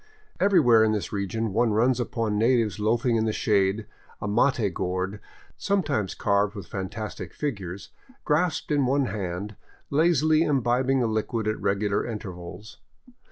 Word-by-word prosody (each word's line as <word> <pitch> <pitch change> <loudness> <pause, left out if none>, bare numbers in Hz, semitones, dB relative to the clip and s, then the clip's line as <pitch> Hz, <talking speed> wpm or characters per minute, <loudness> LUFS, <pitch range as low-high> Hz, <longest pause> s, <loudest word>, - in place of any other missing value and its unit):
Everywhere 145 - +5
in 110 -1 +2
this 105 0 -3
region 105 +2 -2
one 115 0 +2
runs 120 +3 +2
upon 115 -3 -1
natives 115 -2 +2
loafing 115 +3 +1
in 110 - +1
the 110 - +1
shade, 105 0 +1 0.3
a - - -4
mate 110 -2 +2
gourd, 95 +3 -2 0.4
sometimes 150 - 0
carved 100 +1 +1
with 100 - -7
fan 95 -3 -5
tastic 110 0 -6
figures, 100 - -5 0.3
grasped 160 +2 0
in 145 -3 +2
one 140 +1 +2
hand, 100 -1 -4 0.4
lazily 155 0 +3
imbibing 130 -2 +2
the - - +2
liquid 110 0 -1
at 110 - -2
regular 100 +1 0
intervals. 95 -2 -8
110 Hz, 145 wpm, -26 LUFS, 100-130 Hz, 0.4 s, Everywhere